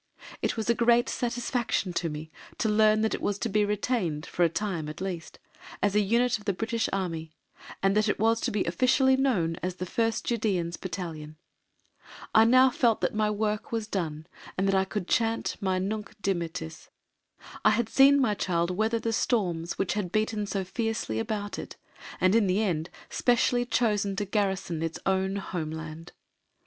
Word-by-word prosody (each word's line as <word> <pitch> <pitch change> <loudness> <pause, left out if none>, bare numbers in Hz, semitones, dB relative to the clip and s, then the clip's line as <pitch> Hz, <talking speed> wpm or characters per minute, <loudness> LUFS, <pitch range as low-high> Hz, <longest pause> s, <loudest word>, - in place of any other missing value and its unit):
It - - -1
was 220 - -2
a 235 - +4
great 235 +1 +3
satisfaction 240 -5 -1
to 170 -1 -1
me 155 +1 -7 0.3
to 225 - 0
learn 215 0 +4
that 220 - +1
it - - -3
was 205 - -1
to 230 - -2
be 210 +1 +2
retained, 205 -7 -1
for 175 - 0
a 170 - +4
time 170 -4 -3
at 155 - -8
least, 180 -4 -5 0.4
as 205 -1 +1
a 210 - +4
unit 230 +3 +2
of 210 - -16
the 200 - +1
British 225 +3 -1
Army, 165 -5 -3 0.5
and 195 +1 +3
that 215 0 +3
it - - 0
was 225 +1 +2
to - - 0
be 205 -2 0
officially 255 +9 +3
known 200 -12 +1
as 185 0 -3
the 185 - -4
First 225 +4 -1
Judæans 195 -8 -1
Battalion. 165 -5 -6 1.0
I 220 0 +7
now 255 +2 +6
felt 235 -3 +2
that - - 0
my 215 0 +1
work 210 0 -2
was 225 -2 -1
done 160 -7 -3 0.3
and 195 +1 +2
I 190 0 +3
could 190 -2 -4
chant 225 0 0
my 190 -1 +1
"Nunc 210 +3 -4
Dimittis." 170 - -3 0.7
I - - +6
had 225 +1 +1
seen 275 +4 +6
my 240 -6 +2
child 170 -3 0
weather 220 +5 +1
the 225 0 -2
storms 175 -8 0
which 195 - 0
had 205 -5 -3
beaten 215 -1 0
so 195 -1 -2
fiercely 225 - -2
about 205 - -3
it, - - -8 0.4
and 185 +1 +3
in 220 -3 +4
the 190 +4 +2
end 165 -5 -1 0.2
specially 245 0 +2
chosen 205 -5 +1
to 205 +1 -2
garrison 195 -5 -1
its 165 0 -2
own 190 0 +1
Home 180 -5 -4
Land. 160 +2 -8
205 Hz, 185 wpm, -28 LUFS, 175-225 Hz, 1.0 s, I